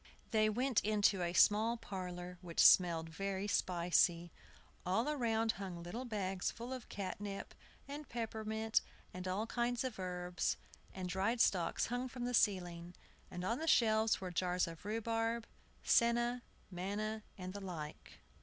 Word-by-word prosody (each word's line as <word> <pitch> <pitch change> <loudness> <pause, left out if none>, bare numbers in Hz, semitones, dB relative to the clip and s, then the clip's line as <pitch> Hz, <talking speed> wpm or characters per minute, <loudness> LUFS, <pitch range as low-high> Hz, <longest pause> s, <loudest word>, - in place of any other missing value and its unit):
They 215 -2 +4
went 250 +2 +1
into 205 -2 +3
a 170 -1 0
small 220 +5 +5
parlor, 180 -4 -6
which 170 -3 -6
smelt 170 -3 +6
very 195 +4 -3
spicy. 175 -2 +2 0.5
All 195 +8 +1
around 230 -6 +1
hung 175 -3 -5
little 225 +9 -5
bags 195 -5 -1
full 240 +3 -6
of 255 -3 -8
catnip, 200 0 -5 0.3
and 290 +1 -7
peppermint, 220 -1 -1 0.3
and 185 0 -5
all 195 +4 -1
kinds 240 +1 -1
of 255 -6 -4
herbs; 180 -1 -2 0.3
and 185 -1 -5
dried 195 +6 0
stalks 180 -6 +2
hung 245 +2 -2
from 245 -1 -5
the 245 - -2
ceiling; 175 -5 +1 0.3
and 180 0 -6
on 230 +7 0
the 320 - -3
shelves 220 -6 +4
were 185 -1 -5
jars 180 +1 +1
of 165 +2 -9
rhubarb, 225 +1 -1 0.4
senna, 240 +1 +3 0.3
manna, 205 +4 -3 0.2
and 185 -1 -6
the 200 - -6
like. 165 -6 -7
205 Hz, 145 wpm, -36 LUFS, 180-230 Hz, 0.5 s, smelt